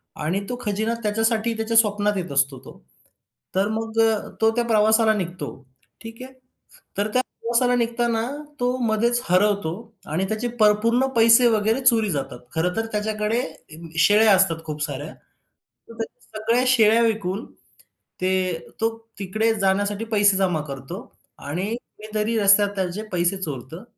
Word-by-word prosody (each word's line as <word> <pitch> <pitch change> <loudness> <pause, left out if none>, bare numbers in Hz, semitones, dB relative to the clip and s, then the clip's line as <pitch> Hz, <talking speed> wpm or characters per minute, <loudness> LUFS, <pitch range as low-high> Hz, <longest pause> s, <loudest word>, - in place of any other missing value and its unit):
आणि 165 +6 -1
तो 250 - -2
खजिना 215 +2 -1
त्याच्यासाठी 225 +2 0
त्याच्या 225 +1 0
स्वप्नात 210 -2 +2
येत 180 -4 -4
असतो 140 -1 +1
तो. - - -12 0.8
तर 195 +2 +2
मग 225 0 -3
अ, 225 -2 +1
तो 220 0 +4
त्या 240 - +1
प्रवासाला 220 0 +4
निघतो, 180 -7 -4 0.5
ठीक 225 +1 -10
आहे. 260 +1 -11 0.6
तर 205 +1 +1
त्या 255 - +3
प्रवासाला 245 0 0
निघताना 235 -1 0 0.4
तो 250 0 +1
मधेच 235 +2 +1
हरवतो 195 -2 +2 0.4
आणि 175 +5 0
त्याचे 220 +3 -2
प - - +5 0.2
पूर्ण 240 +3 +2
पैसे 230 +2 +6
वगैरे 220 +2 +1
चोरी 225 -4 +4
जातात. 135 -5 -4 0.2
खरं 180 +3 0
तर 225 0 -1
त्याच्याकडे 215 +2 -1 0.6
शेळ्या 210 +3 +6
असतात 170 -4 +1
खूप 150 -1 -6
साऱ्या. 145 +1 -5 0.8
तर - - -10
त्या - - -3 0.3
सगळ्या 230 +3 +2
शेळ्या 230 -3 +5
विकून 210 -2 -1 0.8
ते 185 +1 +1 0.5
तो 225 - +4 0.3
तिकडे 215 +4 0
जाण्यासाठी 200 +2 0
पैसे 205 -3 +3
जमा 180 -5 +1
करतो. 135 -2 -7 0.4
आणि 165 +7 -4
कुणीतरी 215 -1 -4
रस्त्यात 200 0 +5
त्याचे 190 +2 -3
पैसे 175 +1 0
चोरतं. 150 - -6
215 Hz, 145 wpm, -23 LUFS, 185-225 Hz, 0.8 s, पैसे